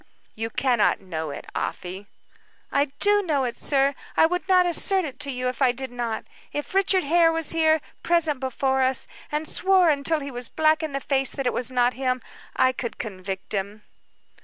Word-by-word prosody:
"You 225 +1 -4
cannot 245 -2 +2
know 160 -5 -5
it, 140 - -7
Afy." 190 +3 -4 0.6
"I 280 +1 +3
do 410 +3 +4
know 300 -8 0
it, 245 -2 -2
sir; 275 0 +1 0.2
I - - +7
would 360 +3 -1
not 365 -1 +5
assert 370 +2 +1
it 280 -2 -7
to 285 -1 -1
you 250 0 -2
if 250 +2 -4
I 260 -2 +5
did 260 +1 -5
not. 240 -2 -3 0.3
If 295 +4 -5
Richard 385 -1 +3
Hare 330 +3 +4
was 325 -2 +1
here, 315 -1 +3 0.2
present 325 -5 +1
before 265 0 0
us, 260 0 +1 0.3
and 300 +1 -2
swore 375 -3 +4
until 300 +2 0
he 280 0 -6
was 245 -1 -3
black 310 0 +2
in 310 -3 -4
the 275 - -1
face 270 -1 +1
that 275 - -4
it 245 - +1
was 245 0 -1
not 250 -1 +2
him, 255 -1 -1 0.4
I 260 - +4
could 250 -2 -5
convict 190 -3 -6
him." 205 +1 -3
270 Hz, 195 wpm, -24 LUFS, 245-320 Hz, 0.6 s, I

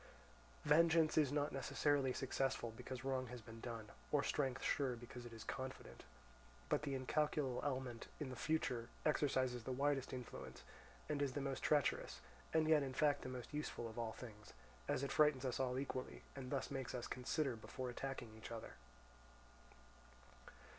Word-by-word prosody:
Vengeance 160 +1 +6
is 150 -4 +5
not 145 0 +1
necessarily 135 0 +2
successful 130 -3 0
because 130 +2 -5
wrong 130 -1 +1
has 125 +1 -6
been 115 0 -10
done, 115 -3 -5 0.2
or 145 -1 +4
strength 135 -2 0
sure 135 -4 +2
because 120 +1 -8
it - - -10
is 115 -1 -7
confident; 130 - -5 0.6
but - - +3
the 140 -2 -1
incalculable 135 -1 +1
element 130 -4 -2
in 150 -4 -2
the - - -4
future 125 -4 0 0.2
exercises 130 -5 +2
the 130 - -3
widest 135 0 +1
influence, 125 -2 -6 0.4
and 145 -1 0
is 140 -2 +1
the 145 - -1
most 135 -1 -2
treacherous, 145 -3 +2 0.3
and 160 -1 +4
yet 155 -2 +7
in 135 -2 -2
fact 145 -1 +4
the - - -4
most 125 +1 -6
useful 150 -5 -2
of 115 +1 -6
all 115 -1 -1
things, 105 -4 -10 0.3
as 130 - +1
it 140 - -1
frightens 150 -3 +5
us 125 - 0
all 130 -1 +1
equally, 130 -1 -3
and 130 -2 -5
thus 135 0 -1
makes 135 -2 -2
us 120 - -2
consider 130 +1 0
before 125 +3 -4
attacking 125 -3 -4
each 110 - -8
other. 115 -1 -6
130 Hz, 165 wpm, -41 LUFS, 125-145 Hz, 0.6 s, yet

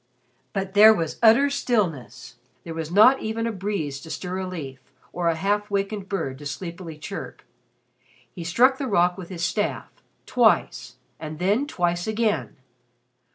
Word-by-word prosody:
But 195 -1 -3
there 215 +2 +8
was 165 -5 -3
utter 235 +5 +5
stillness. 155 - -2 0.3
There 165 - -7
was 160 -1 -5
not 215 +9 +6
even 220 +1 -2
a 230 - -1
breeze 185 -9 -4
to 160 - -11
stir 180 +2 -4
a 190 - -3
leaf, 140 -8 -7 0.3
or 175 -1 -1
a 165 - +2
half 205 +4 -1
wakened 200 0 -2
bird 135 -9 -3
to 145 - -6
sleepily 170 +1 -7
chirp. 150 - -8 0.9
He 175 - -7
struck 250 +11 +3
the 275 - -2
rock 180 -5 +2
with 180 -2 -9
his 175 -2 -3
staff 205 +4 -2 0.3
twice, 125 - +1 0.2
and 155 -1 -7
then 205 - +1
twice 175 - -1
again. 220 -4 -1
185 Hz, 155 wpm, -24 LUFS, 165-215 Hz, 0.9 s, there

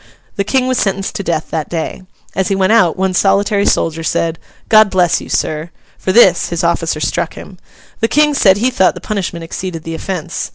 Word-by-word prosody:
The 200 - 0
King 255 +4 0
was 255 -1 0
sentenced 195 -1 -1
to 200 - -4
death 165 -3 -2
that 160 -2 -3
day. 165 +1 -4 0.3
As 190 - 0
he 195 - 0
went 190 +2 +2
out, 180 -8 +3
one 190 0 0
solitary 200 +2 +2
soldier 165 0 0
said, 165 0 -1 0.3
'God 215 -1 +6
bless 180 -3 +2
you, - - -10
Sir!' 155 +2 -2 0.3
For 185 - -1
this, 185 -5 +5
his 170 -1 -2
officer 165 -2 0
struck - - -2
him. 185 -3 -11 0.4
The 225 - +2
King 300 +3 +3
said 195 -8 +4
he 245 +5 +1
thought 190 -6 +2
the - - -7
punishment 185 -5 -4
exceeded 165 0 -6
the 165 - -6
offence. 175 0 -4
185 Hz, 205 wpm, -15 LUFS, 165-205 Hz, 0.4 s, God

